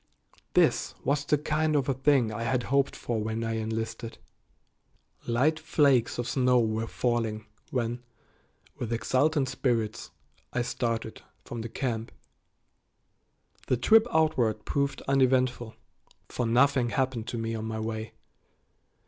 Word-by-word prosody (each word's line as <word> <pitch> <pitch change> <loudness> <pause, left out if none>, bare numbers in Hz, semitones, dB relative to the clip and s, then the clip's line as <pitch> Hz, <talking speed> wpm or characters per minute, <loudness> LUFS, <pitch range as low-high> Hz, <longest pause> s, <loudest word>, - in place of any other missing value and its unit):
This - - +3
was 140 +1 +1
the 150 - +3
kind 155 +1 0
of 140 -3 +1
a 135 - +2
thing 130 -3 +2
I 110 - -4
had 120 +1 0
hoped 140 -1 +2
for 115 -2 -3
when 110 +1 -2
I 115 0 -2
enlisted. 110 +1 -4 1.1
Light 140 +7 +2
flakes 140 -6 +2
of 120 0 -2
snow 125 0 +3
were 110 0 0
falling 115 -4 -1 0.2
when, 120 -1 -2 0.7
with 120 -2 -5
exultant 135 +5 +1
spirits, 115 -5 -1 0.4
I 120 - 0
started 115 -2 -3 0.2
from 120 - -5
the 115 - -5
camp. 115 -2 -3 1.6
The 125 - +2
trip 220 - +5
outward 125 - +1
proved 140 0 -1
uneventful, 130 -3 +1 0.5
for 125 - -2
nothing 125 +1 +3
happened 130 -3 -1
to 120 - -4
me 115 0 -2
on 110 -1 -4
my 110 0 -3
way. 110 0 -4
120 Hz, 130 wpm, -28 LUFS, 115-135 Hz, 1.6 s, trip